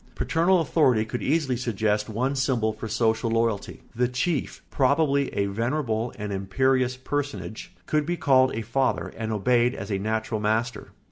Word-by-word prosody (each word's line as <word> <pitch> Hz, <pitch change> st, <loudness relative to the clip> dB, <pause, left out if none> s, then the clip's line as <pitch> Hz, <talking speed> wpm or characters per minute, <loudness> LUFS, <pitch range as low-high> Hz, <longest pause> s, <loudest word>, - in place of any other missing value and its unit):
Paternal 175 Hz, +2 st, +2 dB
authority 130 Hz, -8 st, +2 dB
could 120 Hz, +2 st, -4 dB
easily 145 Hz, -3 st, +1 dB
suggest 110 Hz, -3 st, -1 dB
one 125 Hz, +6 st, -1 dB
symbol 125 Hz, -5 st, +1 dB
for 110 Hz, +1 st, -7 dB
social 110 Hz, +1 st, +1 dB
loyalty: 115 Hz, -2 st, -1 dB
the 125 Hz, +1 st, +2 dB
chief, 130 Hz, +5 st, -2 dB
probably 140 Hz, 0 st, +2 dB
a 100 Hz, -, +1 dB
venerable 115 Hz, +2 st, -1 dB
and 105 Hz, -1 st, -4 dB
imperious 130 Hz, +6 st, +1 dB
personage, 130 Hz, -8 st, -4 dB
could 150 Hz, -1 st, +1 dB
be 175 Hz, 0 st, -1 dB
called 130 Hz, -3 st, +4 dB
a 115 Hz, -, -3 dB
father 130 Hz, +5 st, -1 dB
and 110 Hz, -1 st, -4 dB
obeyed 120 Hz, +3 st, +2 dB
as 100 Hz, +2 st, -6 dB
a 100 Hz, -, 0 dB
natural 110 Hz, +1 st, -2 dB
master. 110 Hz, +2 st, -1 dB
120 Hz, 155 wpm, -25 LUFS, 110-135 Hz, -, called